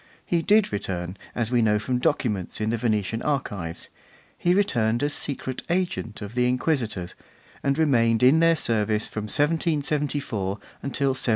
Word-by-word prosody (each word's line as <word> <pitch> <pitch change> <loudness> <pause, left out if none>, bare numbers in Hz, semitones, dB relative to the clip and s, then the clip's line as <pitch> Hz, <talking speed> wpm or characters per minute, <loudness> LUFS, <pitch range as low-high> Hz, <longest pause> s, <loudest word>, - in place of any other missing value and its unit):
He 170 -1 +1
did 210 - +3
return, 90 -2 -3 0.2
as 120 -1 -1
we 120 -1 +3
know 105 -1 +3
from 125 +4 -1
documents 105 -9 -1
in 110 +1 0
the 115 - 0
Venetian 110 -1 -1
archives; 100 - -3 0.5
he 175 - +1
returned 120 - +1
as 145 0 +2
secret 130 -2 -2
agent 175 - -2
of 105 +2 -7
the 125 0 +2
Inquisitors, 125 - -1 0.5
and 140 0 +1
remained 115 -7 +3
in 135 +6 +6
their 165 0 +5
service 110 -6 +1
from 110 -1 -5
1774 145 - 0 0.3
until 140 0 0
1782. 130 -1 -1
125 Hz, 155 wpm, -25 LUFS, 110-145 Hz, 0.5 s, in